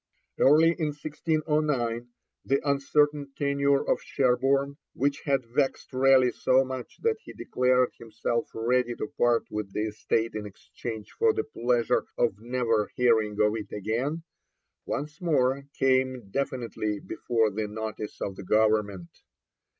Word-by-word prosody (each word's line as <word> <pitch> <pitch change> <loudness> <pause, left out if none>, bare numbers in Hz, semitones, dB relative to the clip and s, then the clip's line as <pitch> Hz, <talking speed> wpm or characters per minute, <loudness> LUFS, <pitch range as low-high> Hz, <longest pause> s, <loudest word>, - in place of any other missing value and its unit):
Early 155 +4 +6
in 155 - +1
1609, 150 -6 -1 0.4
the 135 +1 +1
uncertain 140 0 +1
tenure 140 -1 +1
of - - +1
Sherborne, 135 +2 +1 0.2
which 140 +2 0
had 135 -3 +1
vexed 135 +3 -1
Raleigh 130 -1 +5
so 130 +1 +3
much 130 -1 -7
that 455 -1 +2
he - - -11
declared 125 0 +1
himself 115 +1 -2
ready 120 +1 +1
to - - -3
part 120 -1 +3
with 105 -2 -4
the 105 - -1
estate 110 +2 -1
in 105 -1 -5
exchange 110 +2 -8
for 450 -1 +4
the 430 0 -1
pleasure 120 - 0
of 120 -4 +2
never 115 -2 0
hearing 115 -4 +3
of 105 0 +4
it 105 -2 -6
again, 125 - -2 0.6
once 150 +3 -4
more 140 -5 +1
came 130 -5 +1
definitely 115 -5 -2
before 115 -3 0
the 105 +1 -3
notice 110 0 -6
of 95 - -3
the - - -7
Government. 105 -3 +1
125 Hz, 135 wpm, -27 LUFS, 110-140 Hz, 0.6 s, Early